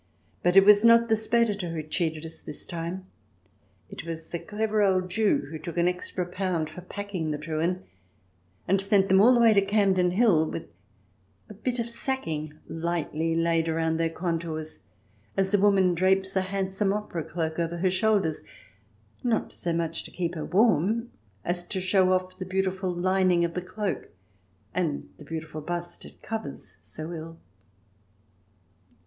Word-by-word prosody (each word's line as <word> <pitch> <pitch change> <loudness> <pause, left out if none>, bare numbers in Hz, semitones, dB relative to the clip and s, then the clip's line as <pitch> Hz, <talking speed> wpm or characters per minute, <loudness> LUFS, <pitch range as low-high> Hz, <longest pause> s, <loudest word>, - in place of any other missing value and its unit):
But 180 +2 +3
it 195 - +9
was 205 +1 +7
not 230 0 +6
the 220 - +5
Speditor 220 -4 +1
who 160 -2 -3
cheated 160 0 -2
us 160 - -6
this 150 - -5
time. 170 +2 -5 0.8
It - - -8
was 165 0 -7
a 170 - -1
clever 215 +2 -1
old 185 -2 +2
Jew 210 -7 +2
who 160 - -5
took 170 +3 -7
an 170 0 +3
extra 180 0 -2
pound 180 -3 -2
for 180 - -9
packing 185 -3 -4
the 150 - -1
Truhen, 165 +4 -2 0.8
and 195 +2 +3
sent 195 0 +3
them 190 +1 +6
all 235 +4 +7
the - - +4
way 230 -2 +6
to 200 - +5
Campden 195 -3 +2
Hill 185 -7 +4
with 165 - -5 0.8
a - - -8
bit 245 +5 -3
of 235 -1 -1
sacking 160 - -3
lightly 165 -1 -1
laid 165 0 +2
round 160 0 0
their 165 0 +2
contours, 165 -2 -3 0.6
as 195 +1 +1
a 205 - +5
woman 195 -3 +4
drapes 190 +2 +2
a 190 - +3
handsome 195 +1 -1
opera 205 -5 -3
cloak 160 0 -3
over 170 0 -1
her 185 +2 +1
shoulders 190 -4 +1 0.4
— - - -35
not 235 -3 0
so 170 - -2
much 165 -1 -1
to - - -8
keep 175 -2 -3
herself 155 -3 -6
warm 215 +3 +3 0.3
as 175 0 -1
to 190 - -3
show 185 0 +3
off 185 0 -1
the 185 - -3
beautiful 190 0 -1
lining 180 0 +2
of 170 - -4
the 180 - -2
cloak, 185 -2 -3 0.7
and 165 -5 -2
the 150 - -11
beautiful 155 0 -6
bust 175 +2 -4
it - - -15
covers 220 0 -6
so 155 +2 -5
ill. 165 0 -7
180 Hz, 170 wpm, -27 LUFS, 165-200 Hz, 0.8 s, it